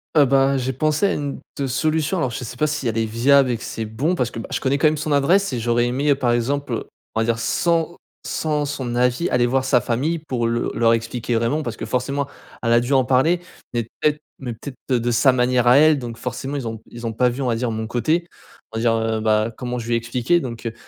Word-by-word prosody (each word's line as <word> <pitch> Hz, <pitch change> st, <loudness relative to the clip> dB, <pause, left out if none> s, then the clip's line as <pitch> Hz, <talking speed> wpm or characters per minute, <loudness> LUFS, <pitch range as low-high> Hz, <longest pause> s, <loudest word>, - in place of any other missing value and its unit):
Heu, 145 Hz, -, +7 dB
ben, 135 Hz, +1 st, +3 dB
j'ai 130 Hz, 0 st, -1 dB
pensé 155 Hz, +7 st, +1 dB
à -, -, +2 dB
une 145 Hz, -1 st, -4 dB, 0.2 s
te 140 Hz, -, -2 dB
solution 155 Hz, +6 st, 0 dB
alors 130 Hz, -8 st, 0 dB
je 125 Hz, -, -5 dB
sais 120 Hz, +1 st, -7 dB
pas 155 Hz, -, +2 dB
si 150 Hz, -4 st, -2 dB
elles 115 Hz, -, -1 dB
est 115 Hz, -, +1 dB
viable 130 Hz, +4 st, +4 dB
et 120 Hz, -, -1 dB
que 115 Hz, -, -11 dB
c'est 110 Hz, -, -4 dB
bon 135 Hz, +12 st, -1 dB
parce 125 Hz, -6 st, -1 dB
que, 115 Hz, -, -6 dB
bah, -, -, -7 dB
je -, -, -1 dB
connais 135 Hz, +2 st, 0 dB
quand 155 Hz, -, +5 dB
même 155 Hz, -, +1 dB
son 150 Hz, 0 st, -3 dB
adresse 155 Hz, +4 st, +3 dB
et 120 Hz, -, -1 dB
j'aurais 120 Hz, +1 st, +1 dB
aimé, 135 Hz, +5 st, 0 dB
heu, 140 Hz, -, +5 dB
par 125 Hz, -3 st, 0 dB
exemple, 125 Hz, +1 st, -1 dB, 0.3 s
on -, -, -1 dB
va 115 Hz, -, +2 dB
dire 115 Hz, 0 st, +1 dB
sans 170 Hz, +6 st, 0 dB, 0.3 s
sans 150 Hz, -2 st, -1 dB
son 130 Hz, -4 st, -4 dB
avis, 125 Hz, +7 st, +1 dB
aller 120 Hz, -1 st, +2 dB
voir 130 Hz, +2 st, +1 dB
sa 130 Hz, -1 st, +3 dB
famille 130 Hz, +9 st, -1 dB
pour 130 Hz, -6 st, -2 dB
le 115 Hz, 0 st, -1 dB
leur 115 Hz, 0 st, +3 dB
expliquer 115 Hz, +1 st, -2 dB
vraiment 115 Hz, +7 st, +1 dB
parce -, -, -5 dB
que -, -, -5 dB
forcément 140 Hz, +3 st, -1 dB, 0.4 s
elle 115 Hz, -1 st, +3 dB
a 120 Hz, -, +6 dB
dû 120 Hz, -, -3 dB
en 130 Hz, -2 st, +4 dB
parler 135 Hz, +7 st, +3 dB, 0.3 s
mais 120 Hz, -1 st, 0 dB
peut 120 Hz, +6 st, 0 dB
être 150 Hz, -, -5 dB, 0.2 s
mais 125 Hz, -3 st, -5 dB
peut-être 130 Hz, +3 st, -9 dB, 0.2 s
de 120 Hz, +1 st, -1 dB
sa 125 Hz, +3 st, +5 dB
manière 125 Hz, -1 st, +2 dB
à 125 Hz, +3 st, +7 dB
elle 155 Hz, -1 st, +5 dB
donc 120 Hz, -2 st, -6 dB
forcément 130 Hz, +4 st, -4 dB
ils 130 Hz, -4 st, -4 dB
ont 110 Hz, -1 st, -6 dB
ils 120 Hz, 0 st, -8 dB
ont 115 Hz, -, -3 dB
pas 125 Hz, +3 st, +3 dB
vu, 125 Hz, +3 st, -4 dB
on -, -, -1 dB
va 115 Hz, -, +1 dB
dire, 120 Hz, +1 st, -1 dB
mon 110 Hz, 0 st, -3 dB
côté, 160 Hz, +9 st, 0 dB, 0.4 s
on 110 Hz, -, -5 dB
va -, -, -1 dB
dire, 115 Hz, -1 st, +3 dB
heu, 110 Hz, 0 st, 0 dB
bah, 110 Hz, +1 st, +2 dB
comment 125 Hz, -1 st, -4 dB
je 115 Hz, -, -7 dB
lui 120 Hz, -, 0 dB
ai -, -, +4 dB
expliqué 120 Hz, +8 st, +1 dB
donc 115 Hz, -4 st, -7 dB
heu, 115 Hz, -, -2 dB
125 Hz, 270 wpm, -21 LUFS, 115-145 Hz, 0.4 s, Heu